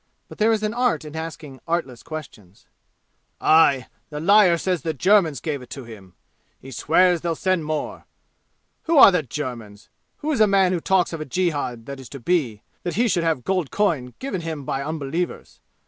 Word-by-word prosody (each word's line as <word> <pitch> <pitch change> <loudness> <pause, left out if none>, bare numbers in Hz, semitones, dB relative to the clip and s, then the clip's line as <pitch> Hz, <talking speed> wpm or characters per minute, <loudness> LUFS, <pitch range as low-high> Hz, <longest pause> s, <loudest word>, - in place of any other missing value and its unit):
But - - -12
there 220 +2 +4
is 215 -1 0
an 215 0 -1
art 245 -8 0
in 150 +1 -9
asking 155 -4 -7
artless 160 -8 -2
questions. 120 - -10 0.7
"Aye! 140 -5 +4 0.2
The 150 -1 -6
liar 185 0 +5
says 180 0 -1
the 160 -2 -3
Germans 175 - +3
gave 145 -1 -4
it 125 - -13
to 135 - -7
him! 100 -6 -13 0.4
He 135 - -12
swears 175 +6 +3
they 175 - -2
will 165 - -1
send 185 -2 0
more. 155 -1 -4 0.8
Who 325 -1 +2
are 230 - +10
the 180 - +1
Germans? 120 -7 -7 0.3
Who 310 - -3
is 260 -7 +1
a 215 - +6
man 195 -2 +3
who 180 - 0
talks 180 0 +1
of 165 - -5
a - - -4
jihad 145 -8 -2
that 140 +1 -7
is 130 - -11
to 140 - -9
be, 125 -8 -1 0.2
that 175 - -4
he 235 +4 +2
should 175 -6 +1
have 160 -6 0
gold 185 -4 -1
coin 155 -12 -1
given 260 -9 -4
him 160 -4 -5
by 135 - -2
unbelievers? 155 +3 -4
160 Hz, 195 wpm, -22 LUFS, 135-185 Hz, 0.8 s, are